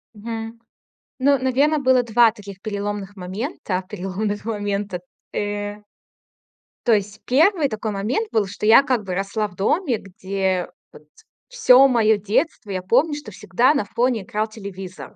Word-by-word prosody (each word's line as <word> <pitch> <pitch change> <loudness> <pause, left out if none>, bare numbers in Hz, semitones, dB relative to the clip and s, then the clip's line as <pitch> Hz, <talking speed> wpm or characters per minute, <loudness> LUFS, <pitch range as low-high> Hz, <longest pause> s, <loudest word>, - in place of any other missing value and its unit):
Мгм. 225 +1 -6 0.6
Ну, 280 +1 +3
наверно, 275 +4 +2
было 260 -2 +4
2 235 0 +4
таких 200 -3 -11
переломных 205 -1 -4
момента, 190 - -4
переломных 205 +2 -3
момента, 205 -3 -2 0.3
э 205 0 -3 1.0
То 230 - +5
есть 210 +1 -1
1 310 +2 +3
такой 215 0 -3
момент 220 - -1
был, 215 -2 +2
что 200 +2 -6
я 230 +5 +7
как 255 -6 0
бы 185 -2 -4
росла 200 +2 -1
в 180 - -17
доме, 255 - +1
где, 190 -1 -2 0.2
вот, 150 - -15 0.4
всё 275 - +6
мое 220 -4 +3
детство 210 - -1
я 185 -1 -2
помню, 290 - +2
что 265 -8 -8
всегда 210 +9 +2
на 210 - 0
фоне 235 -1 0
играл 215 +3 -2
телевизор. 195 -4 -9
215 Hz, 145 wpm, -22 LUFS, 200-250 Hz, 1.0 s, я